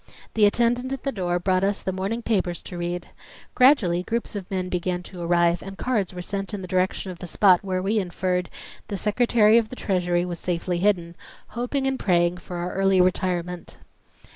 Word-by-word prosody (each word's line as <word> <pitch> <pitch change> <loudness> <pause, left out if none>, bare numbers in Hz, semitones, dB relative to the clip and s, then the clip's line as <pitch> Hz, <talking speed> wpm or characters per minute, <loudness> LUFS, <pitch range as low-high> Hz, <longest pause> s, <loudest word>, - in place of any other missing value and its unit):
The 210 -2 +5
attendant 240 +4 +1
at 270 - -6
the 275 - -1
door 180 -5 -1
brought 185 +1 +1
us 200 0 0
the 190 - -1
morning 195 +6 -3
papers 185 -6 -1
to - - -8
read. 175 0 -4 0.4
Gradually 230 -10 +4
groups 230 +3 -3
of 195 -3 -6
men 185 -1 -2
began 180 0 -2
to 180 -1 -9
arrive 170 0 +2
and 195 0 -9
cards 225 -7 -1
were 180 -1 -7
sent 195 +2 -4
in 195 - -6
the - - -6
direction 185 +1 -1
of 175 - -10
the 180 - -7
spot 185 +1 +4
where 185 -1 -2
we 210 +3 +1
inferred 180 -1 -1 0.4
the 200 - -4
Secretary 220 +1 +4
of 220 -2 -3
the - - -7
Treasury 180 -5 0
was 175 -2 -5
safely 175 0 -2
hidden, 175 -3 +1 0.3
hoping 245 +4 -2
and 265 -1 0
praying 175 -2 +2
for 180 0 -8
our 175 +1 -3
early 195 -1 +3
retirement. 180 -1 0
185 Hz, 195 wpm, -24 LUFS, 175-210 Hz, 0.4 s, The